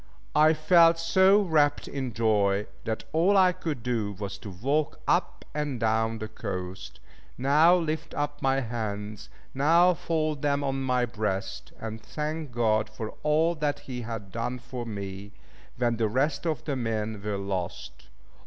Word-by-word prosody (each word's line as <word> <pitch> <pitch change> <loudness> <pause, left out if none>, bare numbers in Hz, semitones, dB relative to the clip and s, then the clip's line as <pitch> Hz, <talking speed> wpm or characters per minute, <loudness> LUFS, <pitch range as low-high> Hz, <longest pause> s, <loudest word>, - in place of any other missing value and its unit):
I 155 +1 +6
felt 165 +1 +5
so 190 +5 +4
wrapt 150 -5 +2
in 130 -3 -4
joy, 105 -3 +2 0.2
that 110 -1 -2
all 180 +5 +4
I 185 -1 +6
could 160 -9 -4
do 115 -4 -1
was 100 0 -6
to 105 - -8
walk 140 - -1
up - - 0
and 145 -4 -2
down 110 0 +1
the 110 0 -5
coast, 95 -4 -6 0.4
now 150 +7 +5
lift 160 -3 -2
up 145 0 -3
my 135 0 +2
hands, 105 -3 -5 0.2
now 170 +6 +5
fold 155 -4 -1
them 145 -1 +1
on 135 -1 -1
my 125 -2 +1
breast, 110 -4 -3
and 110 0 -6
thank 150 +4 -4
God 110 -2 +1
for 110 0 -6
all 155 +3 +2
that 150 -3 -2
He 125 -2 -6
had 110 -4 -6
done 120 +3 -3
for 125 -1 -7
me, 100 -1 -6 0.4
when 120 -1 +1
the 110 -1 +2
rest 140 +7 0
of 155 -3 -1
the 145 - -1
men 110 -3 -2
were 105 -1 -2
lost. 95 -3 -5
125 Hz, 160 wpm, -27 LUFS, 110-150 Hz, 0.4 s, I